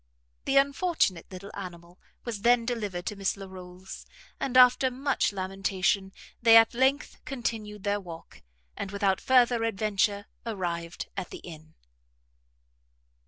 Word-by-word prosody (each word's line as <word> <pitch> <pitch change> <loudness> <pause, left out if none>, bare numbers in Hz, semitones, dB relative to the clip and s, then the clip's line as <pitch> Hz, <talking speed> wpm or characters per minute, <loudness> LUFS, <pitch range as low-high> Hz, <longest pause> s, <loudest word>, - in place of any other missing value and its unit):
The 275 - +2
unfortunate 275 - +1
little 190 +2 -9
animal 175 -2 -9 0.3
was 225 -4 -4
then 240 +1 +4
delivered 205 -7 -3
to 210 - -3
Miss 195 0 -1
Larolles; 185 -1 -10 0.3
and 260 -2 0
after 255 +1 +6
much 265 0 0
lamentation, 195 0 -1 0.3
they 230 -1 +8
at 225 +1 +6
length 265 +4 0
continued 225 -7 -4
their 205 0 0
walk; 170 -4 -11 0.3
and, 195 - -5
without 200 -1 0
further 245 -3 +4
adventure, 205 -2 0 0.2
arrived 175 -6 -4
at 190 -3 -4
the - - -8
inn. 160 -2 -12
205 Hz, 125 wpm, -28 LUFS, 185-240 Hz, 0.3 s, they